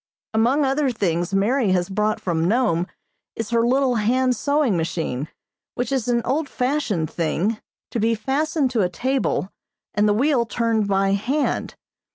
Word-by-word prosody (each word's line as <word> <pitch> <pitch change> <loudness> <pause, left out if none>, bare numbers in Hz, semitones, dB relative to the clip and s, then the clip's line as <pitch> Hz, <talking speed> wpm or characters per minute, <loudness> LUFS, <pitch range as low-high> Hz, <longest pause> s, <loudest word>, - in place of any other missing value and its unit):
Among 245 +7 +3
other 270 +1 +1
things 175 -6 -1
Mary 205 +2 +2
has 175 -1 +1
brought 210 +2 0
from 165 -3 -1
Nome 190 -6 +1 0.5
is 225 0 -4
her 235 -1 +3
little 255 +1 +2
hand 250 +4 +2
sewing 285 -4 +1
machine, 160 -4 -2 0.5
which 245 +2 -2
is 260 -4 0
an 235 -1 +1
old 285 +3 0
fashioned 250 - -1
thing, 185 +6 -1 0.3
to 235 - -2
be 225 +1 +2
fastened 275 +4 0
to 235 -4 +1
a 180 - +1
table 255 -1 -1 0.4
and 210 +1 +3
the - - +4
wheel 255 -1 +2
turned 225 -1 0
by 195 0 +2
hand. 255 +9 -1
230 Hz, 160 wpm, -22 LUFS, 195-260 Hz, 0.5 s, the